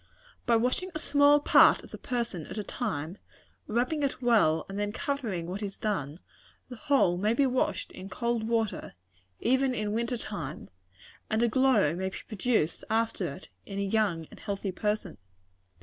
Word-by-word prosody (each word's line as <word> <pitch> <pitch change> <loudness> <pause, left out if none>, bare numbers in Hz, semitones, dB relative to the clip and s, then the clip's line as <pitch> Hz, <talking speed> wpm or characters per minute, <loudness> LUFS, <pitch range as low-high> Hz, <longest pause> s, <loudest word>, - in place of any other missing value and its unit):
"By 235 - +5
washing 250 +11 +1
a - - +1
small 290 -1 +5
part - - +6
of - - -14
the - - -8
person 235 -10 -3
at - - -7
a 210 - -2
time, 180 -6 -4 0.5
rubbing 250 +7 0
it 280 -2 -1
well, 220 -11 +3
and 195 +1 -5
then 205 0 -1
covering 245 - -3
what 185 +4 -5
is 200 -2 -5
done, 160 -7 -2 0.5
the 250 - -7
whole 265 -10 +2
may 210 +4 +2
be 280 - +3
washed 255 -1 0
in 190 +1 -9
cold 235 +1 -1
water, 225 - -1 0.5
even 260 +2 +2
in 210 -1 -2
winter 235 +2 -1
time; 165 -11 -6 0.6
and 220 +2 +1
a - - +4
glow 225 - +3
may 190 +1 -2
be - - -8
produced 215 -7 0
after 220 -6 0
it, 180 - -11 0.2
in 195 - -6
a 200 - 0
young 195 -5 0
and - - -13
healthy 200 -2 -3
person. 210 - -2
220 Hz, 175 wpm, -29 LUFS, 190-245 Hz, 0.6 s, part